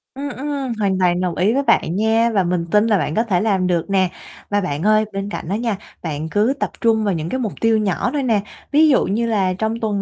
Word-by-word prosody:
Ừm, 285 +1 -4
ừm, 275 -2 -4
hoàn 190 -2 +1
toàn 180 -1 +2
đồng 180 -2 -1
ý 205 +6 +2
với 280 +1 +1
bạn 175 -9 +2
nha, 225 +2 +2
và 195 -2 +2
mình 175 -1 -1
tin 210 +2 +4
là 210 -3 +3
bạn 155 - -2
có 225 - +2
thể 185 -6 0
làm 195 -4 +1
được 175 +1 -1
nè. 190 -2 +2 0.4
Và 205 0 +1
bạn 155 -2 -3
ơi, 215 0 +3
bên 195 +1 -3
cạnh 165 - -6
đó 200 - 0
nha, 230 -2 -1 0.3
bạn 160 -1 -4
cứ 215 +8 +2
tập - - -1
trung 225 -2 +3
vào 200 -3 +1
những 160 0 -3
cái 260 - -2
mục 220 -5 -2
tiêu 225 -1 +3
nhỏ 205 -4 0
thôi 285 -2 -1
nè, 225 -5 +2 0.3
ví 310 +2 +5
dụ 265 - +3
như 220 +5 0
là 195 -5 +1
trong 220 +4 -2
tuần 205 -3 -1
210 Hz, 265 wpm, -20 LUFS, 185-230 Hz, 0.4 s, ví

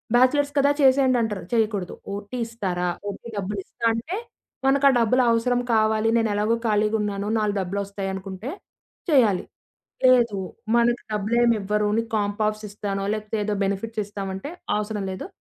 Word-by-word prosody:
"Bachelors 280 +4 +4
కదా, 280 +1 +5
చేసేయండి" 260 -1 +5
అంటారు 210 -3 -2
చేయకూడదు. 210 -5 0 0.2
"ఓటీ 205 +5 -6
ఇస్తారా?" 185 -6 -2 0.2
ఓటీ 200 - -8
డబ్బులు 200 +1 -3
ఇస్తా 230 - -6
అంటే 310 - -3 0.5
మనక 280 +1 +4
డబ్బులవసరం 245 +1 +3
కావాలి 220 0 +3
నేను 225 -1 +2
ఎలాగో 210 +3 +1
ఖాళీగా 210 +1 +2
ఉన్నాను, 205 -1 -2
నాలుగు 210 -1 0
డబ్బులోస్తాయి 195 +1 -3
అనుకుంటే 190 +5 -6 0.6
చేయాలి. 225 - +4 0.6
లేదు 235 -5 +5 0.4
మనకు 235 0 +3
డబ్బులేమి 230 +3 +2
ఇవ్వరు, 210 +1 0
నీకు 230 0 -1
కాంప్ 205 +1 -1
ఆఫ్స్ 215 0 -3
ఇస్తాను, 200 -1 -3
లేపోతే 215 0 -3
ఏదో 210 0 -1
బెనిఫిట్స్ 210 +3 -2
ఇస్తామంటే 195 +4 -5 0.3
అవసరం 210 -1 -3
లేదు. 185 - -6
215 Hz, 140 wpm, -24 LUFS, 200-235 Hz, 0.6 s, కదా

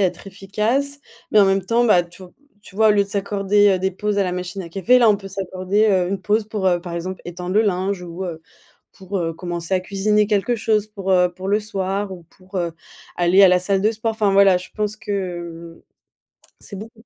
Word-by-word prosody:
être 190 0 -1
efficace, 215 +9 -2 0.3
mais 215 - +4
en 205 - +7
même 195 -1 +1
temps 235 +3 +2
bah, 185 -6 +5
tu 175 +2 -14
v 180 - -13 0.3
tu 200 - -16
vois 220 +2 +4
au - - +6
lieu 205 -1 +3
de - - -16
s'accorder, 200 0 +2
heu, - - -4
des 190 0 -1
pauses 210 +2 -2
à 200 - +2
la 180 - -2
machine 180 +1 -5
à 170 - -9
café, 200 +8 +3
là 235 - +5
on 210 - +4
peut 195 -1 -10
s'accorder, 190 +2 -1
heu, 185 -3 +2
une 195 0 -3
pause 215 +3 +1
pour, 210 -3 -2
heu, 175 -2 +2
par 175 -1 -8
exemple 185 +2 -5
étendre 180 +1 -5
le 215 - +5
linge 190 -1 -1
ou, 175 +2 -6
heu, 160 -3 -6 0.5
pour, 190 +1 -7
heu, 165 -2 -2
commencer 175 +1 -4
à 185 - +1
cuisiner 205 +2 +1
quelque 215 +3 0
chose 215 -1 0
pour, 195 -3 -3
heu, 180 -1 +3
pour 185 +2 -8
le 205 +2 +2
soir 200 -1 -3
ou 175 -2 -10
pour, 185 +1 -11
heu, 170 -2 -1 0.4
aller 180 +3 +5
à 190 - +7
la 180 0 +4
salle 195 +1 0
de 215 +3 +2
sport. 225 +1 -2
Enfin, 210 -2 +1
voilà, 195 -2 +6
je 180 - -11
pense 210 -1 -2
que, 175 -5 -5
hem, - - -32 0.8
c'est 200 - -9
beaucoup. 220 +3 -11
195 Hz, 240 wpm, -21 LUFS, 180-210 Hz, 0.8 s, en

